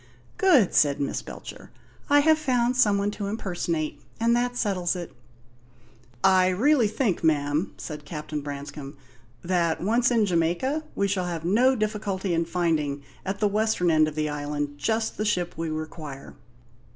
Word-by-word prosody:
"Good," 315 - +5
said 145 -2 +3
Miss 140 - -2
Belcher. - - -10 0.4
"I 290 0 +6
have 315 +1 +4
found 250 -4 +1
some 210 -5 +4
one 200 +1 0
to 205 -1 -5
impersonate; 170 -7 -3 0.2
and 230 +1 +3
that 245 0 0
settles 185 -6 0
it." 175 -2 -6 1.1
"I 185 -1 +5
really 235 +6 +3
think, 215 -4 -1
ma'am," 150 +2 +1
said 150 -2 -7
Captain 150 0 -5
Branscome, 140 0 -7 0.5
"that, 170 -2 +1
once 235 +6 +2
in 230 -3 +3
Jamaica, 180 - 0
we 200 - +1
shall 190 -2 -1
have 170 -2 -4
no 245 +8 +4
difficulty 210 -4 -2
in 165 0 +1
finding, 160 -5 -1 0.2
at 195 +1 -3
the 210 - +4
western 210 -4 +1
end 155 -1 +4
of 155 - -5
the 155 0 0
island, 145 0 -4
just 220 +8 -1
the 215 - -1
ship 180 -4 0
we 165 0 -3
require." 155 -3 -7
180 Hz, 160 wpm, -25 LUFS, 155-220 Hz, 1.1 s, I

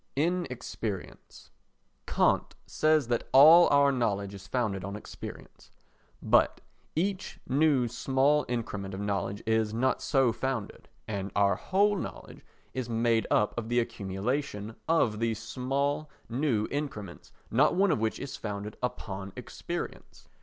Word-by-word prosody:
Inexperience 135 - -4 0.6
Kant - - +2
says 155 -4 +2
that 120 - -1
all 160 +6 +9
our 140 0 +5
knowledge 100 -6 -1
is 95 -1 -10
founded 105 -7 -1
on 100 +2 -5
experience. 105 - -10 0.5
But - - +3 0.4
each 190 +4 -2
new 140 -2 +3
small 135 +5 +2
increment 105 -5 -3
of - - -6
knowledge 100 0 -2
is 110 -1 +1
not 130 +3 +1
so 135 -4 +3
founded, 130 -5 -4 0.2
and 100 -2 -3
our 100 -1 +4
whole 200 - +2
knowledge 185 - -7 0.3
is 130 -2 -4
made 115 -1 +1
up 105 - +2
of 115 -1 -4
the 120 0 +3
accumulation 110 +2 -3
of 120 -10 +2
these 115 -1 0
small 135 +7 -2 0.2
new 120 -4 0
increments 120 -11 -5 0.2
not 135 +7 +4
one 195 0 +3
of 150 - +1
which 110 0 -1
is 140 -1 -6
founded 105 0 -5
upon 100 -5 -4
experience. - - -7
120 Hz, 130 wpm, -29 LUFS, 105-140 Hz, 0.6 s, all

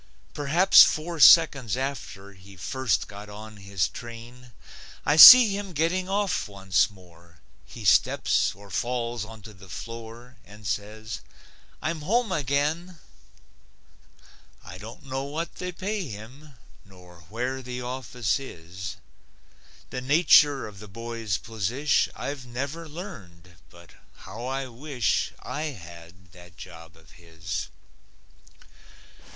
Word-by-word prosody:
Perhaps 155 +6 +5
four 165 +1 +2
seconds 140 - +6
after 130 -7 -6
He 95 +1 -16
first 125 +8 -1
got 105 0 -11
on 110 +1 -10
his 100 -3 -2
train, 120 +3 -11 0.5
I 145 - +3
see 220 +5 +11
him 200 -2 -6
getting 175 +5 -1
off 200 - -1
once 95 -1 +1
more. 85 -4 -19 0.3
He - - -10
steps - - +2
or 100 0 -15
falls 120 +1 -2
onto 110 -1 -12
the 95 -1 -16
floor 115 +4 -9
And 105 -1 -15
says, 105 +3 -5 0.6
"I'm 160 -1 -2
home 220 +6 0
again." 150 +4 -1 1.7
I 90 - -10
don't 115 +8 -11
know 135 0 -4
what 155 +4 -5
they 180 0 -4
pay 190 +1 -4
him, 130 +7 -11 0.3
Nor 90 -2 -17
where 125 +4 -3
the 125 0 -6
office 125 -3 -2
is. 95 -5 -8 1.0
The 125 - -4
nature 145 0 +4
of 100 -2 -11
the 105 - -11
boy's 115 -1 -4
posish 115 +7 -1
I've 140 -2 -5
never 140 +7 -5
learned 95 - -11 0.2
but 85 -1 -17 0.2
how 110 +6 -9
I 135 +1 -3
wish 125 -2 -2
I 150 +2 -4
had 85 - -11
that 90 0 -16
job 80 -2 -12
of 80 0 -21
his! 80 -1 -7
120 Hz, 125 wpm, -25 LUFS, 95-145 Hz, 1.7 s, see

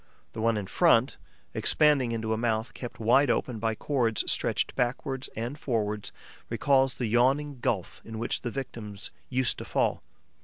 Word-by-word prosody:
The 110 - -5
one 115 -1 +2
in 105 - -3
front, - - +3 0.4
expanding 145 -6 +3
into 110 -1 -1
a - - +1
mouth 110 0 -1
kept 120 - -8
wide 125 +5 +4
open 120 -1 0
by 110 0 0
cords 120 -4 +1
stretched - - +1
backwards 130 +2 -1
and 120 +6 -4
forwards, 105 -6 -1 0.4
recalls 135 +3 +2
the 125 - -2
yawning 130 +5 +2
gulf 100 -6 -2
into 110 0 -7
which 115 - -2
the 120 - -3
victims 110 -6 -6 0.2
used 130 -1 0
to - - -6
fall. - - 0
120 Hz, 160 wpm, -28 LUFS, 110-135 Hz, 0.4 s, wide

